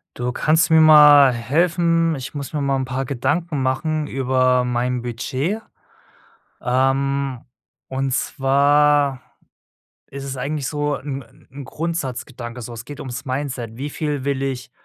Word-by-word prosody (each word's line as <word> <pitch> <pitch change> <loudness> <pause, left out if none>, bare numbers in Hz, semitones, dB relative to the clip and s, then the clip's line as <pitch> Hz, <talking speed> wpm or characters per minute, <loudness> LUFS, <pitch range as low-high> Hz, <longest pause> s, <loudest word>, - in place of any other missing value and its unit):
Du, 125 0 -2
kannst 160 +7 +2
du 160 - +2
mir 160 - +7
mal 150 -3 +8
helfen? 165 +6 +1
Ich 130 -2 -7
muss 140 -2 -6
mir 150 - -1
mal 140 -1 +1
'n 135 - -1
paar 130 +1 -3
Gedanken 145 +4 -1
machen 150 +4 -1
über 130 -1 +1
mein 125 0 -1
Budget. 130 - -3 1.0
Ähm, 135 +1 0 0.5
und 135 0 -2
zwar 140 +1 +2 0.9
ist 140 0 -7
es 135 -1 -5
eigentlich 140 +2 -3
so 145 0 -1
'n 135 0 -6 0.3
'n 140 +1 -9
Grundsatzgedanke 130 -6 -5
so. 120 +1 -8
Es 115 0 -8
geht 145 -1 -9
ums 130 +1 -6
Mindset. 130 -4 -4
Wie 140 +3 -4
viel 145 -3 -3
will 140 -1 -1
ich 130 -2 -4
135 Hz, 145 wpm, -21 LUFS, 130-150 Hz, 1.0 s, mal